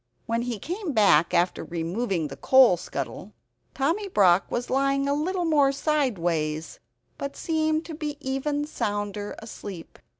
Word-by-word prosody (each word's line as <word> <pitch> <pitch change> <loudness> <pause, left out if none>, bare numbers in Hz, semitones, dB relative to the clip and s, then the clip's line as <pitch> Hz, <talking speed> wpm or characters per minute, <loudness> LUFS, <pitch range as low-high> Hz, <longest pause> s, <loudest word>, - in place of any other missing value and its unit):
When 230 0 0
he 240 -2 -3
came 350 - -4
back 200 -8 +4
after 180 0 +1
removing 175 +1 -2
the 135 - -7
coal 255 - +6
scuttle, 170 - -6 0.4
Tommy 330 +10 0
Brock 195 - +4
was 240 0 -3
lying 275 +1 +2
a 280 - +2
little 350 +5 -1
more 290 -4 +4
sideways; 175 - -1 0.4
but 280 0 -4
he - - -10
seemed 315 -1 0 0.3
even 285 +2 -2
sounder 205 -6 -3
asleep. 200 -5 -9
245 Hz, 135 wpm, -26 LUFS, 185-295 Hz, 0.4 s, coal